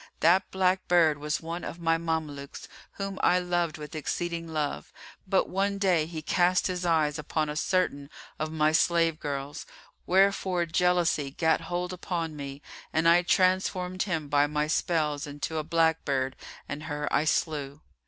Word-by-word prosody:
That 175 Hz, +4 st, +4 dB
black 185 Hz, 0 st, +1 dB
bird 160 Hz, -4 st, +4 dB
was 150 Hz, +1 st, -2 dB
one 165 Hz, +1 st, -5 dB
of -, -, -6 dB
my 165 Hz, -1 st, +2 dB
Mamelukes, 155 Hz, -4 st, -4 dB, 0.3 s
whom 195 Hz, -1 st, -5 dB
I 180 Hz, -, +4 dB
loved 175 Hz, -3 st, -1 dB
with 150 Hz, +2 st, -9 dB
exceeding 165 Hz, +2 st, -3 dB
love; 155 Hz, -3 st, -3 dB, 0.4 s
but 190 Hz, 0 st, +2 dB
one 200 Hz, +1 st, 0 dB
day 180 Hz, -6 st, +2 dB
he 160 Hz, -2 st, -6 dB
cast 180 Hz, +3 st, +2 dB
his 180 Hz, -1 st, -1 dB
eyes 155 Hz, -2 st, +2 dB
upon 150 Hz, 0 st, -1 dB
a 150 Hz, -, -4 dB
certain 150 Hz, -5 st, 0 dB, 0.3 s
of 155 Hz, 0 st, -2 dB
my 155 Hz, -1 st, +2 dB
slave 165 Hz, 0 st, +2 dB
girls, 140 Hz, 0 st, -5 dB, 0.4 s
wherefore 190 Hz, -1 st, +3 dB
jealousy 170 Hz, -3 st, +1 dB
gat 160 Hz, +3 st, +1 dB
hold 175 Hz, +2 st, -3 dB
upon 170 Hz, -3 st, -3 dB
me 140 Hz, 0 st, -7 dB, 0.3 s
and 160 Hz, +1 st, +2 dB
I 170 Hz, +1 st, +6 dB
transformed 185 Hz, 0 st, +1 dB
him 165 Hz, -7 st, -1 dB
by 145 Hz, 0 st, +3 dB
my 150 Hz, 0 st, 0 dB
spells 155 Hz, -2 st, 0 dB
into 145 Hz, +2 st, -4 dB
a 155 Hz, -, -1 dB
black 160 Hz, 0 st, +2 dB
bird 130 Hz, -1 st, -1 dB, 0.3 s
and 150 Hz, +2 st, -6 dB
her 150 Hz, -1 st, -3 dB
I 150 Hz, -, +3 dB
slew. 150 Hz, -2 st, -1 dB
165 Hz, 165 wpm, -28 LUFS, 150-180 Hz, 0.4 s, I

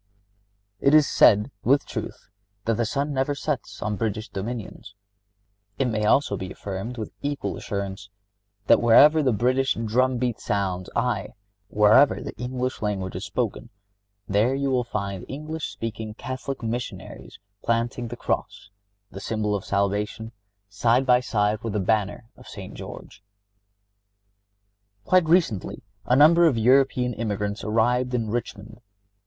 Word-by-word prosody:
It 140 Hz, +2 st, +4 dB
is 150 Hz, -2 st, +6 dB
said, 105 Hz, +5 st, +4 dB
with 140 Hz, +4 st, +3 dB
truth, -, -, -7 dB, 0.3 s
that 115 Hz, -, +2 dB
the 120 Hz, -, 0 dB
sun 140 Hz, +4 st, -2 dB
never 135 Hz, +2 st, 0 dB
sets 140 Hz, -2 st, -4 dB
on 105 Hz, -1 st, -2 dB
British 110 Hz, 0 st, -3 dB
dominions. 105 Hz, 0 st, -6 dB, 0.8 s
It 135 Hz, -, +1 dB
may 110 Hz, -2 st, -1 dB
also 110 Hz, -1 st, +3 dB
be 95 Hz, -1 st, -6 dB
affirmed, 100 Hz, +6 st, -6 dB
with 110 Hz, -, -5 dB
equal 145 Hz, 0 st, -3 dB
assurance, 100 Hz, -1 st, -5 dB, 0.6 s
that -, -, +5 dB
wherever 145 Hz, +7 st, +6 dB
the 135 Hz, -3 st, +2 dB
British 130 Hz, +5 st, +1 dB
drum 125 Hz, +3 st, +1 dB
beat 120 Hz, -2 st, -1 dB
sounds, 95 Hz, -3 st, -2 dB
aye, 120 Hz, -4 st, 0 dB
and -, -, -12 dB, 0.4 s
wherever 105 Hz, +7 st, +5 dB
the -, -, -7 dB
English 125 Hz, +1 st, -3 dB
language 100 Hz, -3 st, -2 dB
is -, -, -4 dB
spoken, -, -, -3 dB, 0.6 s
there 105 Hz, +7 st, +2 dB
you 140 Hz, 0 st, -1 dB
will 125 Hz, -1 st, +2 dB
find 100 Hz, -5 st, -4 dB
the -, -, -12 dB
English 155 Hz, +3 st, -5 dB
speaking 110 Hz, -1 st, -6 dB
Catholic 130 Hz, +1 st, -6 dB
Missionary 120 Hz, +2 st, -5 dB, 0.3 s
planting 115 Hz, +1 st, -1 dB
the 120 Hz, +1 st, -7 dB
cross—the 100 Hz, -2 st, -6 dB
symbol 105 Hz, 0 st, -2 dB
of 100 Hz, -2 st, -2 dB
salvation—side 100 Hz, +3 st, -1 dB
by 125 Hz, -1 st, +5 dB
side 105 Hz, -3 st, 0 dB
with 115 Hz, -2 st, -4 dB
the 105 Hz, -, 0 dB
banner 105 Hz, +3 st, 0 dB
of -, -, -16 dB
St. -, -, -9 dB
George. 100 Hz, -, -10 dB, 1.8 s
Quite 185 Hz, -2 st, +4 dB
recently 160 Hz, -, +1 dB, 0.2 s
a 125 Hz, -, +3 dB
number 165 Hz, +5 st, +6 dB
of 135 Hz, -7 st, +1 dB
European 125 Hz, +1 st, +3 dB
emigrants 105 Hz, -2 st, -3 dB
arrived 125 Hz, +3 st, +1 dB
in 115 Hz, -3 st, -2 dB
Richmond. 110 Hz, -1 st, -5 dB
115 Hz, 140 wpm, -24 LUFS, 105-130 Hz, 1.8 s, is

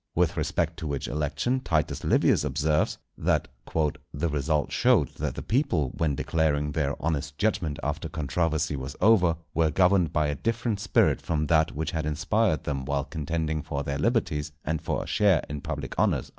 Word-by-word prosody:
With -, -, +2 dB
respect 85 Hz, -1 st, -1 dB
to 80 Hz, -3 st, -5 dB
which 70 Hz, -2 st, -3 dB
election 75 Hz, -, -1 dB
Titus 80 Hz, -11 st, -1 dB
Livius -, -, +3 dB
observes, 75 Hz, +1 st, +1 dB, 0.2 s
that -, -, +1 dB, 0.2 s
"_the 75 Hz, 0 st, -2 dB
result 75 Hz, +1 st, 0 dB
showed -, -, +3 dB
that -, -, -2 dB
the -, -, -5 dB
people 90 Hz, -, +1 dB
when 75 Hz, -4 st, 0 dB
declaring 75 Hz, -1 st, 0 dB
their 70 Hz, -2 st, -1 dB
honest 75 Hz, -2 st, -2 dB
judgment 100 Hz, -9 st, 0 dB
after 75 Hz, +3 st, -2 dB
controversy 80 Hz, +1 st, -1 dB
was 65 Hz, 0 st, -6 dB
over, 90 Hz, -5 st, +5 dB, 0.2 s
were 80 Hz, -1 st, +3 dB
governed 90 Hz, 0 st, +3 dB
by 75 Hz, -, +1 dB
a 75 Hz, -, 0 dB
different 115 Hz, -, -1 dB
spirit 100 Hz, 0 st, +2 dB
from 75 Hz, -2 st, -1 dB
that 80 Hz, 0 st, +2 dB
which 80 Hz, +2 st, -2 dB
had 80 Hz, -2 st, -2 dB
inspired 90 Hz, +3 st, +1 dB
them 70 Hz, -2 st, -2 dB
while 70 Hz, 0 st, -1 dB
contending 80 Hz, 0 st, -2 dB
for 70 Hz, 0 st, -4 dB
their 70 Hz, 0 st, -3 dB
liberties 80 Hz, -, 0 dB
and 80 Hz, 0 st, -1 dB
for -, -, -2 dB
a -, -, -10 dB
share 100 Hz, -6 st, +3 dB
in 75 Hz, 0 st, -5 dB
public -, -, -5 dB
honours_." -, -, +1 dB
80 Hz, 175 wpm, -27 LUFS, 75-85 Hz, 0.2 s, over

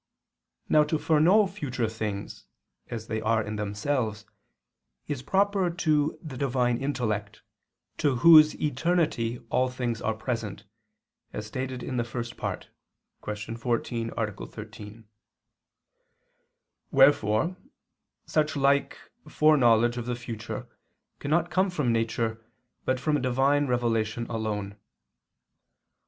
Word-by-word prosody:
Now, 150 Hz, -, +5 dB
to 155 Hz, +1 st, 0 dB
foreknow 165 Hz, +8 st, +4 dB
future 130 Hz, -10 st, -3 dB
things, 110 Hz, -2 st, -5 dB, 0.4 s
as 110 Hz, -2 st, -6 dB
they 110 Hz, -1 st, -3 dB
are 110 Hz, 0 st, +1 dB
in 105 Hz, 0 st, -5 dB
themselves, 105 Hz, +1 st, -2 dB, 0.8 s
is 145 Hz, -4 st, -3 dB
proper 195 Hz, +3 st, +2 dB
to 155 Hz, -3 st, +1 dB
the 145 Hz, -5 st, -7 dB
Divine 125 Hz, -3 st, +1 dB
intellect, 110 Hz, -7 st, -2 dB, 0.6 s
to 140 Hz, -3 st, +2 dB
Whose 155 Hz, +3 st, +7 dB
eternity 150 Hz, -5 st, 0 dB
all 130 Hz, 0 st, +2 dB
things 125 Hz, -3 st, -3 dB
are 110 Hz, -, -1 dB
present, 110 Hz, -3 st, -4 dB, 0.7 s
as 105 Hz, -, -5 dB
stated 130 Hz, +3 st, -4 dB
in 130 Hz, -, -3 dB
the 120 Hz, -, +1 dB
First 120 Hz, 0 st, -5 dB
Part -, -, -5 dB, 0.5 s
(Q. 105 Hz, +2 st, -5 dB
14, 115 Hz, -1 st, -2 dB
A. 110 Hz, -2 st, 0 dB, 0.2 s
13). 110 Hz, 0 st, -10 dB, 1.8 s
Wherefore 135 Hz, -, +4 dB, 0.7 s
such 155 Hz, 0 st, 0 dB
like 140 Hz, 0 st, +2 dB, 0.3 s
foreknowledge 120 Hz, -7 st, +4 dB
of 120 Hz, 0 st, -4 dB
the 120 Hz, -, -1 dB
future 115 Hz, -2 st, -6 dB, 0.5 s
cannot 165 Hz, +4 st, 0 dB
come 190 Hz, +1 st, +2 dB
from 150 Hz, -10 st, 0 dB
nature, 115 Hz, 0 st, -1 dB, 0.4 s
but 130 Hz, 0 st, +1 dB
from 150 Hz, +1 st, +1 dB
Divine 135 Hz, +3 st, +2 dB
revelation 115 Hz, -2 st, 0 dB
alone. 105 Hz, -3 st, -3 dB
120 Hz, 115 wpm, -27 LUFS, 110-145 Hz, 1.8 s, Whose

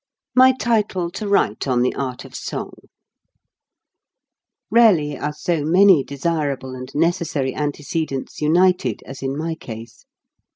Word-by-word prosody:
MY 260 Hz, +1 st, +7 dB
TITLE 210 Hz, -7 st, 0 dB
TO 210 Hz, +3 st, -5 dB
WRITE 140 Hz, -, +1 dB
ON 125 Hz, -2 st, +2 dB
THE 125 Hz, -, +1 dB
ART 130 Hz, -2 st, -4 dB
OF -, -, -13 dB
SONG -, -, -5 dB, 2.0 s
Rarely 190 Hz, -11 st, +4 dB
are 150 Hz, +2 st, -3 dB
so 155 Hz, +1 st, -2 dB
many 180 Hz, -1 st, +5 dB
desirable 140 Hz, -2 st, -2 dB
and 130 Hz, 0 st, -8 dB
neces 170 Hz, +2 st, +1 dB
sary 135 Hz, -4 st, -2 dB
antecedents 150 Hz, -1 st, -3 dB
united 165 Hz, -, +2 dB
as 135 Hz, 0 st, -9 dB
in 135 Hz, +1 st, -3 dB
my 165 Hz, +1 st, -2 dB
case. 115 Hz, -5 st, -10 dB
150 Hz, 130 wpm, -21 LUFS, 135-180 Hz, 2.0 s, MY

